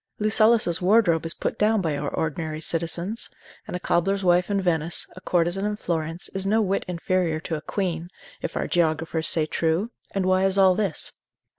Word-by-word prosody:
Lucullus's 215 -4 +3
wardrobe 180 -4 +3
is 165 - +3
put - - -3
down 215 +1 +3
by 160 -6 -1
our 145 0 -2
ordinary 155 0 -3
citizens; 170 +6 -1 0.4
and - - -5
a - - -2
cobbler's 195 +3 0
wife 180 +1 +3
in 200 -1 +1
Venice, 170 -3 0
a 185 - -11
courtesan 175 +2 0
in 210 0 -1
Florence, 165 -3 -3
is 195 0 -2
no 215 +3 +3
whit 195 -2 0
inferior 175 -2 0
to 165 - -5
a 150 - -5
queen, 175 -2 -3 0.3
if - - -4
our - - -1
geographers 160 -1 0
say 160 -2 +2
true: 165 +8 0 0.2
and 195 -2 -2
why 185 0 +3
is 195 0 +1
all 190 -1 +6
this? 195 -5 -1
175 Hz, 185 wpm, -24 LUFS, 165-195 Hz, 0.4 s, all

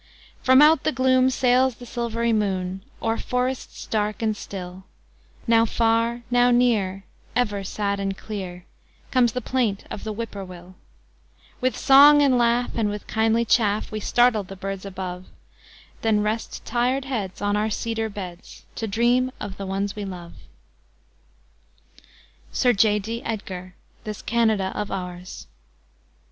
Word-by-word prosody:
From 260 +2 +6
out 310 +1 +6
the - - +1
gloom 260 0 +3
sails 255 0 +2
the 245 - -11
silv'ry 235 -1 -1
moon, 190 -3 -1 0.2
O'er 225 0 0
forests 250 +1 -3
dark 215 0 -1
and 215 -1 +1
still, 185 -2 -8 0.6
Now 230 -1 +5
far, 230 +1 +1
now 245 0 +4
near, 220 -6 +2 0.3
ever 210 -5 0
sad 200 +1 -2
and 195 -1 -2
clear, 185 -4 -7 0.5
Comes 245 -3 +3
the 250 - -2
plaint 230 -5 -1
of - - -6
the 220 - -3
whip 230 +1 -5
poor 200 -1 -6
will; 180 0 -11 0.9
With 255 0 0
song 290 +2 +7
and 270 -3 +4
laugh, 240 +1 +2
and 220 -3 +1
with 205 0 -5
kindly 225 +1 +1
chaff, 210 -2 +2
We 215 - -3
startle 240 +1 +3
the 195 0 -10
birds 195 0 -5
above, 185 -1 -6 0.7
Then 215 -2 +2
rest 215 +2 -3
tired 250 +3 0
heads 215 -9 -4
on 205 0 0
our 210 +1 +1
cedar 225 +1 -2
beds, 185 -4 -9
To 225 - -2
dream 240 +4 +2
of 195 -2 -6
the 195 - -5
ones 195 +1 -2
we 210 - -5
love. 180 -3 -8 2.2
SIR 245 -1 +3
J. 210 0 +3
D. 225 +3 -4
EDGAR: 185 -4 -5 0.3
"This 215 -1 -6
Canada 220 -5 +1
of 210 - -3
Ours." 180 -1 -6
220 Hz, 150 wpm, -24 LUFS, 195-240 Hz, 2.2 s, song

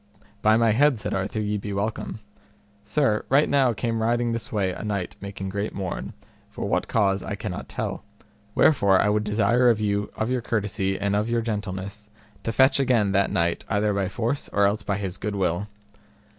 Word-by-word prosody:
By 110 +1 +5
my 115 -1 +4
head, 135 +3 +4
said 105 - -4
Arthur, 95 +3 -2
ye 105 0 -1
be 100 0 -5
welcome. 105 +1 -3 0.6
Sir, 135 -8 +1
right 140 +3 +4
now 135 -3 +3
came 115 0 -2
riding 120 +1 +1
this 115 -1 -4
way 100 -4 0
a - - -7
knight 100 -4 -3
making 100 -1 -5
great 100 +2 -3
mourn, 95 -3 -4 0.4
for - - -5
what - - 0
cause 100 -3 +2
I - - -4
cannot - - -6
tell; - - -4 0.5
wherefore 100 -10 +4
I 105 - +3
would 105 0 +1
desire 110 +4 +3
of 115 -2 +3
you 105 -1 -1
of 110 +3 -1
your 130 -1 0
courtesy 100 -4 -1
and 100 0 0
of 105 +2 0
your 115 0 +1
gentleness 105 -1 -5 0.3
to 115 - -2
fetch 130 +4 +4
again 120 -7 +2
that 100 0 +2
knight 85 0 0
either 105 0 +1
by 100 -2 0
force 120 +6 -2
or 100 0 +3
else 105 +2 +1
by 100 -2 -2
his 95 -2 -4
good 105 -1 -3
will. 95 +1 0
105 Hz, 195 wpm, -25 LUFS, 100-115 Hz, 0.6 s, By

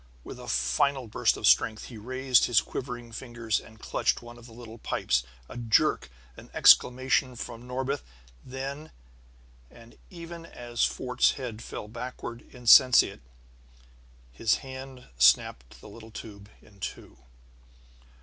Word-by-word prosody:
With - - -9
a - - -10
final 135 - +1
burst 110 - +1
of - - -4
strength 110 -1 +3
he 120 - -10
raised 130 +2 +2
his 120 -3 +4
quivering 120 -2 -6
fingers 120 -2 -3
and 110 - -16
clutched - - 0
one 120 0 -12
of 120 - -14
the - - -15
little 115 -1 -11
pipes. 65 - 0 0.3
A - - -10
jerk, 115 -2 +2 0.3
an - - -14
exclamation 130 0 +4
from 120 +1 -8
Norbith; 130 +2 -2 0.4
and 135 +4 -6 0.8
then, 115 0 -17
even 170 -1 -9
as 120 -4 -3
Fort's 125 -1 +1
head 120 -5 -7
fell 105 - -7
back 120 +3 -7
insensate, 125 +1 +4 1.1
his 105 - +1
hand 130 -1 -9
snapped - - +3
the - - -12
little 110 +2 -12
tube 105 -2 -10
in 100 -2 -20
two. 90 - -7
120 Hz, 135 wpm, -27 LUFS, 110-130 Hz, 1.1 s, his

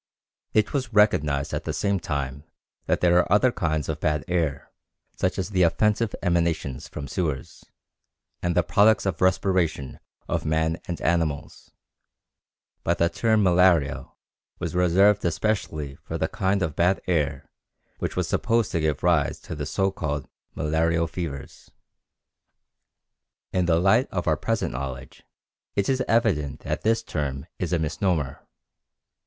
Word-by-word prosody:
It 110 -1 +2
was 130 -5 -1
recognized 75 -10 +3
at - - -2
the - - -2
same 100 -2 0
time 70 -3 -4 0.4
that - - +1
there 90 0 +5
are 90 - 0
other 115 +5 +5
kinds 80 - -1
of 80 -1 -3
bad 75 -1 0
air, 80 -6 -1 0.4
such 90 +2 -1
as 95 +1 -3
the 95 -2 +1
offensive 105 +5 +2
emanations 85 -7 0
from 75 -2 -7
sewers 75 -3 -3 0.8
and 85 -1 0
the 90 - +4
products 105 +4 +4
of 95 -5 -2
respiration 90 -6 +1 0.3
of - - -1
man 80 +1 0
and 85 - -4
animals, 80 -4 -1 1.1
but - - +1
the 85 - +3
term 110 0 +2
malaria 90 -6 +3 0.5
was - - -4
reserved 95 +3 +4
especially 85 -5 -1
for 80 - -6
the 80 - 0
kind 100 -2 0
of 80 -6 -2
bad 90 +3 +2
air 75 -6 -1 0.5
which - - -3
was - - 0
supposed 115 -2 +1
to 85 - 0
give 75 -3 -1
rise 85 -5 +2
to - - -7
the 75 -1 -4
so 95 +4 0
called 75 -6 -3 0.3
malarial 80 +2 +1
fevers. 80 -5 -7 1.8
In 90 -1 +2
the 80 -1 +3
light 100 +8 +4
of 90 -2 -3
our 80 - +4
present 115 +7 -1
knowledge 65 0 -6 0.5
it 100 - +1
is 130 -1 +1
evident 95 - +1
that - - -3
this 115 +1 +1
term 70 -8 -3
is - - -2
a 90 - +2
misnomer. 80 -2 -1
85 Hz, 150 wpm, -25 LUFS, 75-95 Hz, 1.8 s, there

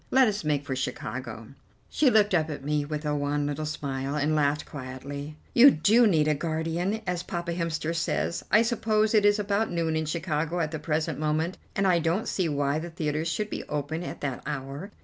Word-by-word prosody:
Let 265 -1 +5
us 205 -3 -1
make 145 -2 0
for 130 - -2
Chicago." 120 -3 -5 0.4
She 295 - +3
looked 210 -4 +4
up 160 -3 +2
at 145 -3 -6
me 150 +1 0
with 150 +1 -4
a 150 - 0
wan 145 0 0
little 145 +1 -2
smile, 140 -2 -3
and 150 +1 +1
laughed 150 -1 +1
quietly. 140 +2 -7 0.2
"You 255 +4 +9
do 225 - +4
need 155 -6 +3
a 155 - +4
guardian, 165 +6 -2
as 180 -1 -1
Papa 175 -1 -4
Hemster 165 -2 -2
says. 170 +1 -1
I 215 +2 +5
suppose 220 -2 +1
it 210 -2 +4
is 205 0 +4
about 205 +1 0
noon 165 -2 0
in 160 -1 -1
Chicago 165 +1 -1
at 160 -2 -1
the 155 - -4
present 155 0 -1
moment, 155 +3 -1 0.2
and 195 - +1
I 180 -2 +4
don't 170 +6 0
see 180 -4 0
why 145 0 0
the 170 +2 -6
theatres 155 -1 -2
should 210 +6 -2
be - - -4
open 150 +2 -3
at 175 - -6
that 135 -4 -3
hour. 145 +5 -5
160 Hz, 210 wpm, -27 LUFS, 145-180 Hz, 0.4 s, You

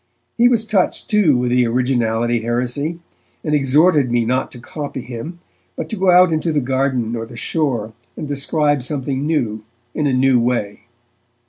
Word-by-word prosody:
He 240 +1 +5
was 230 -3 +1
touched, 210 -1 0
too, 195 - +4
with 125 0 -1
the 125 -1 +3
'originality' 120 -1 0
heresy, 125 +7 -2 0.5
and 150 - -1
exhorted 145 0 +3
me 120 -1 +1
not 130 +3 -1
to 125 - -11
copy 140 +1 -6
him, 125 +8 -7 0.4
but - - -5
to - - -3
go 190 -2 +1
out 180 -1 +6
into 160 +1 0
the 150 - +1
garden 130 -3 -1
or 115 -1 -5
the 120 0 -11
shore 120 -7 -1 0.2
and 155 - -5
describe 145 0 +1
something 135 +1 -2
new, 115 -9 -1 0.3
in 150 -2 0
a 135 - +1
new 130 -1 +3
way. 115 -4 -2
135 Hz, 170 wpm, -19 LUFS, 120-155 Hz, 0.5 s, out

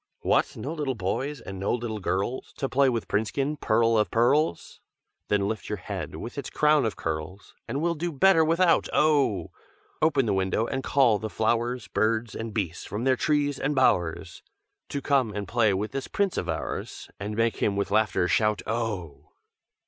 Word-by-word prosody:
"'What! - - +1
no 150 - -4
little 145 -5 -2
boys, 130 +9 -3
and 95 -1 -8
no 100 - -1
little 115 -3 -4
girls, 100 +7 -2
To 135 - -1
play 135 +1 +3
with 115 -3 -2
Princekin, 135 +8 -1
pearl 115 -2 +2
of 105 - +1
pearls? 120 - +1 0.5
Then 100 -1 +1
lift 110 -1 -4
your - - -2
head, - - -6
with - - -6
its - - -6
crown 150 -3 +3
of 110 - -1
curls, 80 +5 -5
And 140 +3 -2
we'll 170 0 +2
do 170 +2 -3
better 165 +3 +5
without, 165 +2 +3
oh! 140 - +2 0.5
Open 155 -5 +3
the 105 - +1
window 95 +3 0
and 135 +2 -3
call 125 -8 +3
the 110 - -4
flowers 115 +1 0
Birds 110 +3 0
and 115 0 -5
beasts 90 -6 -3
from 105 +4 -5
their 130 0 +3
trees 145 0 0
and 145 +2 -1
bowers, 90 -7 +1 0.5
To 140 -1 -4
come 130 -7 +1
and 100 -2 -4
play 110 +1 +3
with 100 +2 -2
this 135 -1 -4
Prince 200 -2 0
of 90 - -3
ours, 80 -1 -4
And 105 +1 -4
make 115 +1 +1
him 100 - 0
with 100 - -2
laughter 110 -4 +2
shout, 105 +1 +1
oh!' 105 -9 -4
115 Hz, 185 wpm, -26 LUFS, 100-140 Hz, 0.5 s, better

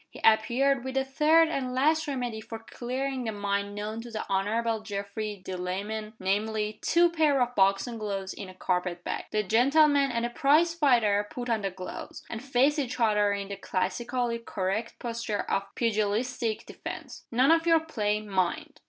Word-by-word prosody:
He - - -12
appeared 240 +4 +3
with 265 0 -5
the 270 - +2
third 310 +4 +4
and 255 -5 -2
last 310 +4 +2
remedy 245 -5 -3
for 225 +1 -7
clearing 255 +3 -4
the 225 - -2
mind 200 0 -2
known 215 +2 -4
to 240 - -9
the 220 -2 -4
Honorable 220 +4 0
Geoffrey 205 -1 -5
Delamayn 200 +4 -4
namely, 210 +2 -1
two 345 +1 +4
pair 310 -4 +3
of 245 0 +1
boxing 200 +3 +2
gloves 195 -2 -3
in 195 - -8
a 185 - -12
carpet 180 -1 -1
bag. - - -3
The 215 0 0
gentleman 275 +6 +4
and 235 -1 -1
the 240 - -3
prize 305 +7 +3
fighter 230 -10 +3
put 245 -1 -4
on 220 -2 +1
the 195 - -1
gloves, 185 0 -8
and 225 +2 -5
faced 275 +3 +2
each 250 -2 -3
other 210 -3 +3
in 200 -1 -3
the 200 - -5
classically 235 +6 -1
correct 215 0 -3
posture 230 -3 -3
of 195 - -1
pugilistic 225 +1 0
defense. - - -8
"None 255 +5 +4
of 330 0 +3
your 330 -1 +5
play, 215 -10 -1
mind!" 190 -4 -2
225 Hz, 175 wpm, -28 LUFS, 205-260 Hz, -, your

